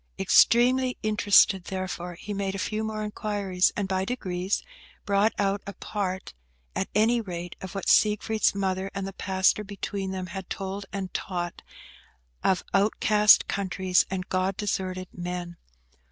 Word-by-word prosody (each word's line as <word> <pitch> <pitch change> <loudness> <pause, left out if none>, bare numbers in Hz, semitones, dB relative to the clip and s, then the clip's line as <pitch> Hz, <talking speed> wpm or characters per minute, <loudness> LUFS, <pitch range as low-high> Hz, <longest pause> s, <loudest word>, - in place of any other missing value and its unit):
Extremely 250 +2 +4
interested, 205 -3 +4
therefore, 185 -2 -4
he 205 +4 -6
made 195 -1 -2
a - - -3
few 215 +3 -2
more 215 -1 -3
inquiries, 205 -3 0
and, 200 -2 -1
by 190 0 0
degrees, 190 -4 -2 0.4
brought 205 +2 +3
out 200 0 0
a 200 - -5
part, 190 - -4 0.4
at - - -2
any 230 +3 +3
rate, 175 -4 -6
of 190 +1 -8
what 195 - -4
Siegfried's 215 0 +3
mother 190 -1 -1
and 195 -1 -3
the 195 - -6
pastor 190 +2 +1
between 200 -1 -4
them 190 -1 -4
had 190 -2 -6
told 195 +1 -5
and 190 -2 -5
taught 175 -2 -4 0.8
of 185 -2 +2
outcast 210 +1 +5
countries 185 -2 +1
and 185 0 -4
God 185 +1 0
deserted 185 -3 -2
men. 175 -1 -5
195 Hz, 145 wpm, -26 LUFS, 185-210 Hz, 0.8 s, outcast